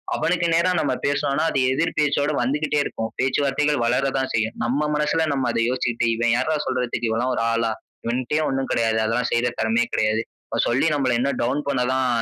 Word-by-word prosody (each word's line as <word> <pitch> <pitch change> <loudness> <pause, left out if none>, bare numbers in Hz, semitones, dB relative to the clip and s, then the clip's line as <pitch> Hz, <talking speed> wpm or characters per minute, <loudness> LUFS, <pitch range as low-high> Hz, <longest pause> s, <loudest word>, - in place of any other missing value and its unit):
அவனுக்கு 170 0 +1
நேரா 170 +2 +3
நம்ம - - 0
பேசுனோம்னா 140 +1 0
அது 135 - 0
எதிர் 155 +6 0
பேச்சோட 145 0 +1
வந்துகிட்டே 145 +4 0
இருக்கும். 110 -4 -4
பேச்சுவார்த்தைகள் 140 +1 +1
வளர 130 +3 +1
தா 135 - +1
செய்யும். 110 0 0
நம்ம 145 +4 0
மனசுல 150 +2 +1
நம்ம 130 -3 0
அத - - -1
யோசிச்சுட்டு, 120 -2 -1
"இவன் 120 0 +1
யாருடா 155 +5 0
சொல்றதுக்கு 125 -2 -1
இவன்லா 115 +3 0
1 - - -1
ஆளா? 115 -1 0 0.3
இவன்டயே 125 +6 0
1 135 0 -2
கெடையாது 115 -1 +1
அதெல்லா 115 +3 0
செய்ற 120 +1 +2
திறமையே 230 +1 +1
கெடையாது. 110 +1 +1 0.3
இவன் - - 0
சொல்லி 130 +7 +2
நம்மள 130 -3 +1
இன்னு 140 +2 0
டவுன் 140 +4 -1
பண்ண 130 -3 +1
தான் 130 -1 +1
130 Hz, 185 wpm, -22 LUFS, 120-150 Hz, 0.3 s, நேரா